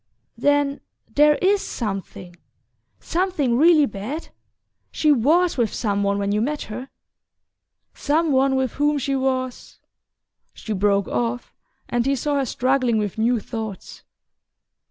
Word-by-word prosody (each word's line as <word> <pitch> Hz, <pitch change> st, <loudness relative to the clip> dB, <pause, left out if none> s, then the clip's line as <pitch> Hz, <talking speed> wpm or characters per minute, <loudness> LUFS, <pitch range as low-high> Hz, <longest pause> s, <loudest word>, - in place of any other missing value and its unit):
"Then 285 Hz, +3 st, +1 dB, 0.3 s
there 295 Hz, +1 st, +5 dB
IS 395 Hz, +1 st, +3 dB
something 195 Hz, -5 st, -5 dB, 0.6 s
something 335 Hz, -9 st, 0 dB
really 310 Hz, +2 st, +5 dB
bad? 245 Hz, +8 st, -6 dB, 0.6 s
She 305 Hz, -, +2 dB
WAS 310 Hz, +7 st, +3 dB
with 230 Hz, -4 st, +1 dB
some 205 Hz, -3 st, -1 dB
one 200 Hz, 0 st, +1 dB
when 200 Hz, 0 st, -1 dB
you 210 Hz, +1 st, +1 dB
met 295 Hz, +5 st, -2 dB
her? 250 Hz, +5 st, -7 dB, 1.0 s
Some 310 Hz, +2 st, 0 dB
one 265 Hz, 0 st, +3 dB
with 260 Hz, -3 st, 0 dB
whom 295 Hz, +1 st, +1 dB
she 275 Hz, 0 st, -1 dB
was 260 Hz, -1 st, -2 dB, 0.4 s
" -, -, -52 dB
She 220 Hz, -, -5 dB
broke 200 Hz, 0 st, +1 dB
off, 240 Hz, +1 st, -3 dB, 0.3 s
and 240 Hz, +1 st, 0 dB
he 275 Hz, -, +2 dB
saw 290 Hz, +2 st, -1 dB
her 270 Hz, -, 0 dB
struggling 255 Hz, -2 st, +1 dB
with 210 Hz, 0 st, -3 dB
new 235 Hz, +1 st, +2 dB
thoughts. 220 Hz, -3 st, -7 dB
260 Hz, 135 wpm, -22 LUFS, 220-290 Hz, 1.0 s, there